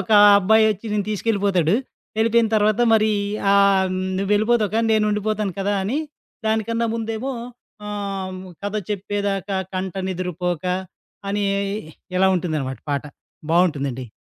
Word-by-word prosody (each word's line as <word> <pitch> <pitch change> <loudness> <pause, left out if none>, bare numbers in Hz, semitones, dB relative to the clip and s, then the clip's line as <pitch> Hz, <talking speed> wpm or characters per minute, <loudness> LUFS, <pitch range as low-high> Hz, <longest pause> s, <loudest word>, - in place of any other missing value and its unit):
ఒక 195 +3 -2 0.3
అబ్బాయి 220 +3 +4
ఒచ్చి 210 +3 -11
నిన్ను 205 -1 -1
తీసుకెళ్ళిపోతాడు. 200 -5 +1 0.4
వెళ్ళిపోయిన 225 0 +3
తర్వాత 215 +2 +2
మరి 215 0 +3 0.4
ఆహ్, 200 -1 +4 0.3
నువ్వు 195 +1 -2
వెళ్ళిపోతావు 215 0 +2
కానీ 225 0 +2
నేనుండిపోతాను 210 -1 0
కదా, 200 +1 0
అని 240 +10 -1 0.5
దానికన్నా 230 +1 0
ముందేమో 225 +3 -3 0.6
ఆహ్, 195 -2 -4 0.3
'కథ 205 +1 -3 0.2
చెప్పేదాకా 200 -1 -2 0.2
కంట 185 -1 -3
నిదురపోక' 180 -1 -2 0.6
అని 205 0 0 0.7
ఇలా 190 +1 +4
ఉంటుందనమాట 155 - -2
పాట. 140 -1 0 0.5
బావుంటుందండి. 140 -7 +1
200 Hz, 115 wpm, -22 LUFS, 185-215 Hz, 0.7 s, అబ్బాయి